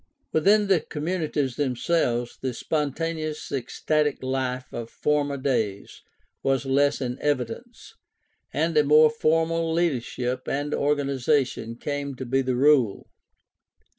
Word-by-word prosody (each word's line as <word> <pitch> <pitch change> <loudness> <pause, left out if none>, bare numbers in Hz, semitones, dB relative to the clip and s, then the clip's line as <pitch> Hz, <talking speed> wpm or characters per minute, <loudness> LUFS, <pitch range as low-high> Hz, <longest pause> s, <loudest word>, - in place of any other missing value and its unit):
Within 205 +6 +4
the 195 -4 +3
com 150 -1 -7
munities 150 -7 -1
themselves 125 -3 0
the 130 -2 -3
spontaneous 155 +2 -2
ecstatic 145 +3 -1
life 130 -1 -2
of 115 -1 -5
former 145 0 0
days 115 -7 -2 0.4
was 135 0 0
less 140 +2 +2
in 125 -1 -3
evidence, 130 -6 -3 0.6
and 160 +2 0
a 150 - +5
more 150 +1 +6
formal 165 +1 +1
leadership 130 -6 -1
and 145 +2 -2
organization 140 -4 0
came 140 +1 -4
to 130 - -6
be 135 +2 +1
the 130 -1 -1
rule. 130 -6 +3
140 Hz, 120 wpm, -25 LUFS, 130-155 Hz, 0.6 s, more